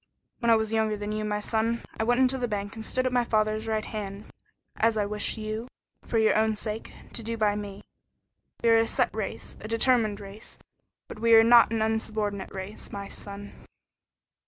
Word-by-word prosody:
When 235 Hz, -, +1 dB
I 230 Hz, -, +7 dB
was 220 Hz, 0 st, 0 dB
younger 220 Hz, -1 st, +1 dB
than 205 Hz, +1 st, -4 dB
you, 215 Hz, 0 st, -2 dB
my 210 Hz, 0 st, -1 dB
son, 225 Hz, +2 st, -1 dB, 0.2 s
I -, -, +2 dB
went 245 Hz, +2 st, +2 dB
into 260 Hz, 0 st, +3 dB
the 245 Hz, -, 0 dB
bank 205 Hz, -2 st, -3 dB
and 220 Hz, -, -7 dB
stood 255 Hz, +3 st, -1 dB
at 255 Hz, -, 0 dB
my 245 Hz, -1 st, +3 dB
father's 215 Hz, -1 st, 0 dB
right 220 Hz, -1 st, -1 dB
hand, 205 Hz, -1 st, -6 dB, 0.5 s
as 225 Hz, 0 st, +2 dB
I 210 Hz, -, +1 dB
wish 210 Hz, +2 st, -2 dB
you 215 Hz, +2 st, -4 dB, 0.4 s
for 230 Hz, -, -1 dB
your 220 Hz, -1 st, +4 dB
own 220 Hz, 0 st, +2 dB
sake 215 Hz, +1 st, -4 dB, 0.2 s
to -, -, -3 dB
do 230 Hz, +1 st, -4 dB
by 210 Hz, -2 st, +2 dB
me. 205 Hz, -1 st, -6 dB, 0.8 s
We 230 Hz, -, +4 dB
are 225 Hz, 0 st, +6 dB
a 225 Hz, -, +2 dB
set -, -, +1 dB
race -, -, -5 dB
a -, -, -6 dB
determined 230 Hz, -2 st, +2 dB
race, 200 Hz, +1 st, -9 dB, 0.5 s
but -, -, -9 dB
we 230 Hz, 0 st, +6 dB
are 225 Hz, -, +8 dB
not 235 Hz, -1 st, +7 dB
an 225 Hz, -1 st, +1 dB
insubordinate 215 Hz, -3 st, -2 dB
race, 195 Hz, +2 st, -7 dB
my 200 Hz, -1 st, -6 dB
son." 200 Hz, 0 st, -7 dB
220 Hz, 205 wpm, -27 LUFS, 210-230 Hz, 0.8 s, are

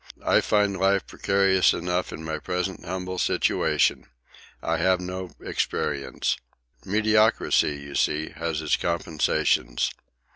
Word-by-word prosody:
"I -, -, +4 dB
find 100 Hz, -2 st, +1 dB
life 100 Hz, +1 st, +2 dB
precarious 95 Hz, -1 st, +2 dB
enough 90 Hz, +1 st, -2 dB
in 80 Hz, -, -7 dB
my 80 Hz, -1 st, -3 dB
present 90 Hz, +3 st, -3 dB
humble 90 Hz, +1 st, -4 dB
situation. -, -, +1 dB, 0.5 s
I 85 Hz, 0 st, -1 dB
have 95 Hz, +2 st, +2 dB
no 90 Hz, 0 st, -5 dB
experience. 70 Hz, -2 st, -2 dB, 0.5 s
Mediocrity, 110 Hz, -6 st, +2 dB
you 70 Hz, 0 st, -9 dB
see, 75 Hz, +2 st, 0 dB
has 80 Hz, -2 st, -3 dB
its 75 Hz, -, +2 dB
compensations." 80 Hz, -7 st, 0 dB
90 Hz, 115 wpm, -25 LUFS, 80-95 Hz, 0.5 s, I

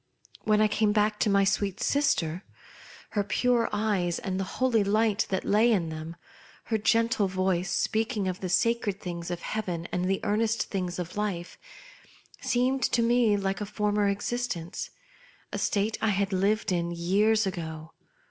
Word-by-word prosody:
When 215 Hz, 0 st, +3 dB
I 215 Hz, -, +5 dB
came 215 Hz, 0 st, +1 dB
back 210 Hz, 0 st, +1 dB
to -, -, +2 dB
my 200 Hz, 0 st, +4 dB
sweet 195 Hz, 0 st, 0 dB
sister, 185 Hz, -, +1 dB, 0.7 s
her 205 Hz, -, 0 dB
pure 240 Hz, +4 st, +1 dB
eyes 205 Hz, -5 st, 0 dB
and 190 Hz, 0 st, -3 dB
the -, -, 0 dB
holy 250 Hz, -5 st, +3 dB
light 215 Hz, +1 st, +1 dB
that 190 Hz, -1 st, -1 dB
lay 220 Hz, +4 st, +4 dB
in 175 Hz, -7 st, +1 dB
them, 160 Hz, +1 st, -7 dB, 0.5 s
her 220 Hz, -1 st, -1 dB
gentle 230 Hz, -1 st, +2 dB
voice 185 Hz, -1 st, 0 dB
speaking 220 Hz, -1 st, 0 dB
of 185 Hz, -1 st, -3 dB
the 185 Hz, -, -4 dB
sacred 210 Hz, +1 st, +1 dB
things 170 Hz, -2 st, -5 dB
of 175 Hz, -1 st, -4 dB
heaven 180 Hz, -6 st, -3 dB
and 180 Hz, 0 st, -1 dB
the 190 Hz, +1 st, +1 dB
earnest 225 Hz, +2 st, +1 dB
things 180 Hz, -3 st, -2 dB
of 180 Hz, +2 st, -5 dB
life, 195 Hz, -5 st, -3 dB, 0.8 s
seemed 255 Hz, +2 st, +1 dB
to 235 Hz, -, +2 dB
me 230 Hz, -3 st, +3 dB
like 195 Hz, 0 st, -2 dB
a -, -, -1 dB
former 210 Hz, 0 st, 0 dB
existence; 200 Hz, -4 st, -3 dB, 0.6 s
a -, -, -2 dB
state 210 Hz, +2 st, 0 dB
I 220 Hz, -, +2 dB
had 200 Hz, 0 st, 0 dB
lived 200 Hz, +3 st, +1 dB
in 170 Hz, -1 st, 0 dB
years 200 Hz, +6 st, +2 dB
ago. 160 Hz, -4 st, -5 dB
205 Hz, 165 wpm, -27 LUFS, 180-220 Hz, 0.8 s, I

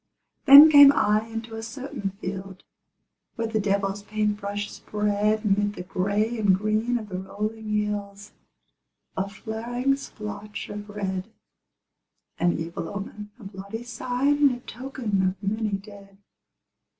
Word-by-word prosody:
Then 290 Hz, +3 st, +11 dB
came 285 Hz, -1 st, +10 dB
I 215 Hz, -1 st, +2 dB
into 225 Hz, 0 st, -6 dB
a 225 Hz, -, -5 dB
certain 225 Hz, -3 st, -5 dB
field 190 Hz, 0 st, -6 dB, 0.7 s
Where 230 Hz, -, -2 dB
the 220 Hz, -1 st, -1 dB
devil's 200 Hz, 0 st, 0 dB
paint 210 Hz, 0 st, -1 dB
brush 205 Hz, 0 st, -4 dB
spread 210 Hz, +1 st, -1 dB
'Mid 205 Hz, 0 st, +1 dB
the 180 Hz, -, -6 dB
gray 205 Hz, +5 st, -1 dB
and 200 Hz, -3 st, +4 dB
green 215 Hz, +4 st, 0 dB
of 220 Hz, -3 st, -7 dB
the 185 Hz, -1 st, -4 dB
rolling 215 Hz, +3 st, -5 dB
hills 205 Hz, -1 st, -3 dB, 0.8 s
A 195 Hz, +1 st, -2 dB
flaring 235 Hz, +6 st, -2 dB
splotch 210 Hz, -5 st, -7 dB
of 205 Hz, 0 st, -7 dB
red, 195 Hz, 0 st, -4 dB, 1.1 s
An 175 Hz, 0 st, +2 dB
evil 165 Hz, 0 st, -5 dB
omen, 205 Hz, +1 st, -7 dB
a -, -, -13 dB
bloody 200 Hz, +3 st, -7 dB
sign, 250 Hz, +4 st, 0 dB
And 285 Hz, -2 st, +5 dB
a 245 Hz, -, -6 dB
token 240 Hz, -6 st, -3 dB
of 185 Hz, +1 st, -1 dB
many 215 Hz, 0 st, -1 dB
dead. 200 Hz, -1 st, -14 dB
210 Hz, 140 wpm, -25 LUFS, 200-225 Hz, 1.1 s, Then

